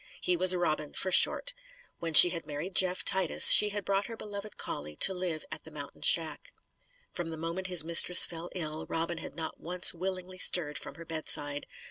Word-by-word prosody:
He 180 - -2
was 185 +1 +6
Robin, 155 -4 -5
for 185 - -6
short. - - +1 0.5
When 165 -2 -7
she 175 - +10
had 165 -3 -9
married 155 +6 -9
Jeff 185 -1 +1
Titus, 190 -4 +5
she 210 - +5
had 205 -1 -8
brought 195 0 -3
her 230 -1 -11
beloved 205 -1 -11
collie 75 +1 -8
to 190 - +1
live 180 -4 -7
at 155 -1 -10
the - - -15
mountain 145 -2 -13
shack. 165 - -2 0.6
From 175 -2 -8
the 160 - -10
moment 170 +3 -7
his 180 -4 +1
mistress 170 +2 +6
fell 170 +1 -11
ill, 155 -3 -6
Robin 165 +1 -6
had - - -12
not 160 -1 -9
once 180 +2 +2
willingly 185 +1 -9
stirred 155 -6 0
from - - -11
her 170 - -14
bedside. 145 -3 -4
175 Hz, 195 wpm, -27 LUFS, 160-185 Hz, 0.6 s, she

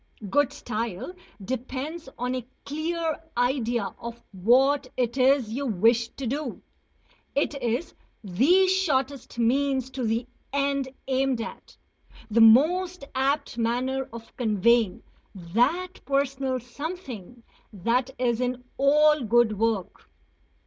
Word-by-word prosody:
Good 290 -2 +3
style 225 - -4 0.3
depends 265 - -4
on 250 +1 -2
a 255 -1 -3 0.2
clear 320 +2 -2 0.2
idea 240 -4 0
of 235 0 -7
what 255 +8 +3
it 240 -1 0
is 260 -3 +3
you 275 +3 -2
wish 230 +2 +3
to 275 - -5
do; 275 +1 -3 0.7
it 285 +1 +1
is 240 +6 -1 0.3
the 280 - +4
shortest 280 -10 0
means 265 +2 +1
to 260 -1 -4
the 225 +1 0 0.3
end 275 -1 0 0.2
aimed 265 -2 +1
at, 230 - -8 0.5
the 230 +2 +4
most 335 +10 +5
apt 275 -1 0
manner 255 +3 -1
of 230 0 -11
conveying 225 -2 +2 0.3
that 245 - 0
personal 275 -2 0
"something" 250 - -7 0.3
that 235 +6 0
is 240 -1 0
in 250 0 -2 0.2
all 300 +1 +5
good 225 -2 +3
work. 225 -5 -1
255 Hz, 115 wpm, -26 LUFS, 230-280 Hz, 0.7 s, most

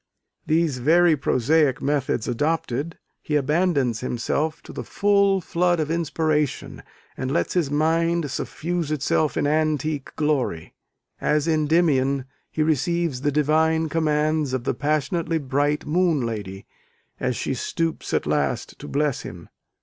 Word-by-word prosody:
These 155 -4 +1
very 165 +5 +4
prosaic 140 +1 +2
methods 140 -5 -1
adopted, 145 +3 -1 0.2
he 150 - -2
abandons 145 -5 +1
himself 140 +6 -2
to - - -11
the - - -5
full 200 -1 +2
flood 175 0 +1
of 155 0 -1
inspiration, 155 -3 -1 0.3
and 130 - -3
lets 160 - 0
his 170 -6 +1
mind 165 +1 +1
suffuse 170 +1 -3
itself 155 +1 0
in - - +1
antique 155 -1 0
glory. 140 - -1 0.5
As 150 +1 +1
Endymion, 150 -4 +2 0.2
he 155 - 0
receives 160 -1 0
the 145 +1 +1
divine 160 +2 +2
commands 155 -2 +1
of 130 -2 -1
the - - 0
passionately 155 +3 0
bright 145 +1 0
Moon 160 -4 +1
Lady, 100 -4 -5 0.5
as 125 -1 -1
she 135 - -2
stoops 165 +6 -3
at - - 0
last 75 -1 -1
to - - -8
bless 145 -2 0
him. 85 -1 -10
150 Hz, 135 wpm, -23 LUFS, 135-165 Hz, 0.5 s, very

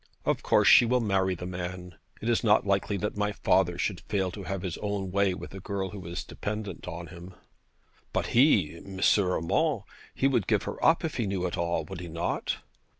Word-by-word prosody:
Of - - +1
course - - +3
she - - +9
will 125 +2 +2
marry 95 -4 +1
the 90 - -7
man. 90 0 -5 0.3
It - - -2
is 120 -1 +2
not 105 -2 +4
likely 100 +1 +1
that 105 +2 -3
my 105 0 0
father - - +2
should - - -1
fail 95 -3 0
to 100 +1 -8
have 95 -1 -3
his 90 -4 -4
own 100 -2 -3
way 100 -1 +2
with - - -9
a 95 - -7
girl 95 -1 -3
who 95 -1 -8
is 85 +1 -4
dependent 105 -2 -5
on 85 0 -5
him.' 90 +2 -11 0.8
'But - - 0
he 105 - +4
M. 95 +2 -9 0.2
Urmand; 90 -4 +1 0.3
he - - 0
would 125 -8 +1
give - - +2
her - - -6
up 165 +1 +4
if 160 - -3
he 115 -4 0
knew 95 -2 -1
it 90 - -2
all, 85 -1 -1
would 95 -2 -7
he 90 - -7
not?' 85 +1 -2
95 Hz, 210 wpm, -28 LUFS, 90-105 Hz, 0.8 s, she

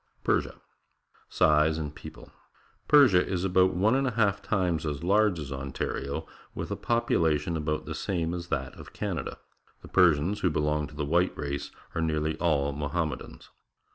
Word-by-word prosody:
PERSIA - - 0 0.7
Size 75 +1 +3
and 75 -3 -4
People. - - -12 0.3
— - - -35
Persia 125 -12 +6
is 90 -2 -2
about 95 -1 +3
one 105 +6 +3
and 135 0 +2
a 120 - -3
half 100 -3 +2
times 90 -6 0
as 75 -1 -3
large 100 0 +3
as 75 -3 -6
Ontario, 70 0 -4 0.3
with - - -5
a - - 0
population 85 -9 +1
about 75 -1 -2
the - - -5
same 85 -3 -2
as 85 -1 -5
that 70 -4 -3
of - - -12
Canada. - - -4 0.5
The - - -11
Persians, 90 +2 +3
who 90 - +2
belong 75 -1 0
to 75 - -14
the 75 -1 -2
white 85 +5 +1
race, 70 -1 -4 0.2
are 80 - -2
nearly 80 -1 0
all 70 -5 +1
Mohammedans. 75 +3 -4
80 Hz, 170 wpm, -28 LUFS, 75-95 Hz, 0.7 s, Persia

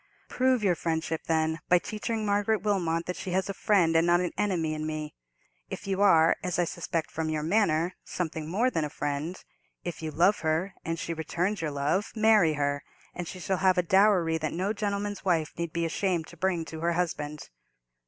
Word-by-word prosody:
"Prove 255 -3 +2
your 190 -3 +4
friendship, 160 -1 -2
then, 160 0 +1
by 180 - +7
teaching 215 +4 -3
Margaret 205 0 +1
Wilmot 170 -5 0
that 180 - -3
she - - -6
has 190 +2 0
a - - -1
friend 185 -5 +2
and 165 +1 +4
not 175 0 +5
an 180 -1 -1
enemy 175 -6 0
in 155 0 -3
me. 155 -1 -4 0.6
If - - -6
you 195 0 -1
are—as 175 -2 +4
I 175 - +3
suspect 170 -1 -3
from 160 -1 -2
your 155 -1 -1
manner—something 165 -3 -1
more 230 +9 +2
than 165 - 0
a 150 - -2
friend: 145 +5 -3 0.5
if 175 -2 -5
you 160 - -3
love 175 +7 +3
her, 160 +4 0
and 165 0 -2
she 165 - -3
returns 175 +5 -2
your 160 - -1
love, 145 +9 -1
marry 215 -7 +5
her, 145 -1 -1 0.3
and 175 -2 -5
she 185 - -7
shall 190 +2 -1
have 185 0 +3
a 180 - +3
dowry 180 -3 +3
that 155 -1 -2
no 190 +5 -1
gentleman's 205 -1 -3
wife 165 -5 +1
need 170 -1 -3
be 170 0 -1
ashamed 170 0 0
to - - -13
bring 175 -1 0
to 160 0 -8
her 170 +1 +1
husband." 150 -4 -3
170 Hz, 200 wpm, -28 LUFS, 160-195 Hz, 0.6 s, by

